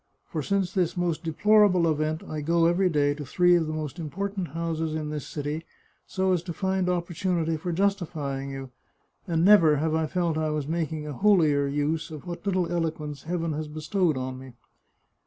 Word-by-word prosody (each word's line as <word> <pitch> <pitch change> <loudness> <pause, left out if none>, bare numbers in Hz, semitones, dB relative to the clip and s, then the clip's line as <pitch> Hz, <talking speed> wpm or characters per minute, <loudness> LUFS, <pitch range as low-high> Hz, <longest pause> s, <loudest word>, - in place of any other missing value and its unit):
For 155 - -2
since 195 +4 0
this 180 -3 0
most 175 -1 -1
deplorable 185 +1 +4
event 155 0 0
I 155 -1 -4
go 165 +2 +2
every 180 +2 +3
day 145 -3 +2
to 145 0 -7
three 175 +6 +3
of 165 -2 +1
the 155 - -3
most 155 +1 -5
important 190 +4 -3
houses 160 0 -3
in 155 -1 -3
this 150 -2 -5
city, 150 +2 -4 0.4
so 190 -1 +1
as 175 - +1
to 170 0 -6
find 190 +1 0
opportunity 175 -1 -1
for 165 +3 -4
justifying 165 -8 -1
you, 135 -1 -7 0.6
and 165 -1 +1
never 170 -7 +7
have 155 +2 0
I 160 0 +1
felt 170 -1 0
I 155 0 0
was 150 -2 -2
making 160 -1 -2
a 150 - -5
holier 155 -5 +3
use 145 +4 -1
of 155 -3 -9
what 175 -1 -6
little 185 -3 +1
eloquence 155 -4 -3
Heaven 165 -1 -2
has 155 +1 -4
bestowed 155 +1 0
on 130 0 -4
me." 130 -1 -11
160 Hz, 190 wpm, -26 LUFS, 150-180 Hz, 0.6 s, never